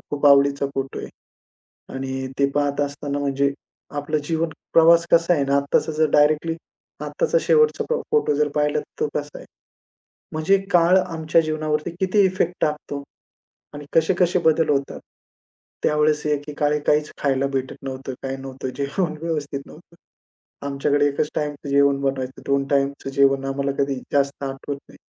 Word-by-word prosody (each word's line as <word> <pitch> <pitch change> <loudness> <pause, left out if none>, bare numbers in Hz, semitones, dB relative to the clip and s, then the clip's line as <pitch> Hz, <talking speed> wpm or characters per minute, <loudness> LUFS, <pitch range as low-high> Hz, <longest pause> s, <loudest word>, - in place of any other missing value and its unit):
खूप 145 0 +1
आवडीचा 140 0 +5
फोटो 135 0 -3
आहे - - -6 0.9
आणि 130 0 -4
ते 140 - +5
पाहत 145 0 +1
असताना 145 0 -3
म्हणजे 140 0 0 0.4
आपला 145 +2 -1
जीवन 160 +2 -1 0.2
प्रवास 165 +1 +6
कसा 170 +1 +5
आहे 145 -4 +1
ना 140 0 +1
आत्ताचा 140 +3 +1
जर 155 0 +1
डायरेक्टली 155 +2 +3 0.5
आत्ताचा - - 0
शेवटचा 460 -1 +3
फो 475 0 0
फोटो 450 - +2
जर 150 +1 +2
पाहिला, 150 0 +1
तर - - -7 0.2
तो - - +1
कसा 145 0 -6
आहे, - - -12 0.9
म्हणजे 155 +6 +2
काळ 175 +1 +5
आमच्या 165 -3 +1
जीवनावरती 155 -1 -2
किती 190 +2 +2
इफेक्ट 180 -2 0
टाकतो 150 -1 -2 0.7
आणि 145 0 -8
कसे-कसे 180 +2 +3
बदल 160 0 +3
होतात. 140 -1 0 0.8
त्यावेळेस 150 0 +2
एकीकाळी 150 0 0
काहीच 150 0 +2
खायला 135 -1 +1
भेटत 130 -1 -2
नव्हतं, 135 0 -5
काही 135 0 -3
नव्हतं 135 -1 -6
जेवण 155 +3 -2
व्यवस्थित 150 -4 -3
नव्हतं. 170 +2 -16 0.7
आमच्याकडे 145 +1 +1
एकच 145 +1 -1
टाईमचं 145 -1 -3
जेवण 140 0 +3
बनवायचं, 135 -1 -3
2 140 0 +1
टाईमचं 140 -1 0
जेवण 135 0 +3
आम्हाला 140 0 -1
कधी 140 0 -1 0.2
जास्त 140 0 0
आठवत 135 +1 -5
नाही. - - -17
145 Hz, 150 wpm, -22 LUFS, 140-155 Hz, 0.9 s, प्रवास